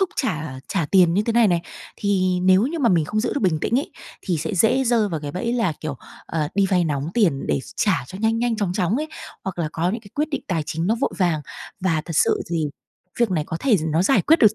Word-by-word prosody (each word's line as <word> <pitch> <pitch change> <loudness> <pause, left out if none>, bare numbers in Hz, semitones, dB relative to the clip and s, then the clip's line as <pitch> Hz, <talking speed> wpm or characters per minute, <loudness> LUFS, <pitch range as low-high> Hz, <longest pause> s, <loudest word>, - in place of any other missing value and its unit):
thúc 385 - +2
trả 155 - -2
trả 170 -6 0
tiền 175 -1 +4
như 200 - +3
thế 230 - -1
này 230 -2 +5
này, 175 -2 +2 0.4
thì 185 -3 +1
nếu 185 +2 +5
như 330 +4 -3
mà 260 -6 +3
mình 170 -6 +3
không 215 +8 -1
giữ 230 - -1
được 285 - -1
bình 180 -6 +2
tĩnh 240 - +1
ấy, 285 - -4 0.3
thì 180 -4 -1
sẽ 160 +7 -3
dễ 225 +8 +3
rơi 230 -4 +2
vào 165 -5 -3
cái 145 -1 -5
bẫy 235 +6 -2
là, 230 -8 +1
kiểu, 150 -3 -4 0.3
ờ, 155 -2 -1
đi 200 0 +3
vay 180 -2 +3
nóng 145 -2 -2
tiền 175 - +2
để 70 - +1 0.2
trả - - +1
cho 190 - -9
nhanh 225 +1 +1
nhanh 235 -1 0
chóng 200 -5 -1
chóng 185 +3 0
ấy, 305 +3 -2 0.4
hoặc 190 -2 -5
là 160 -3 0
có 170 +2 0
những 225 +4 -3
cái 200 -3 -16
quyết 300 +1 0
định 285 - -2
tài 165 -5 0
chính 165 +2 -2
nó 220 - +3
vội - - +1
vàng. 175 -5 +2 0.4
Và 165 -4 +1
thật 165 -3 -4
sự - - +3
thì 165 -3 0 0.5
việc 235 -4 +3
này 160 -5 0
có 165 - -3
thể 255 -6 +4
nó 160 +3 +2
giải 265 +8 +3
quyết 325 +2 +5
được 215 -1 +5
185 Hz, 270 wpm, -22 LUFS, 165-225 Hz, 0.5 s, này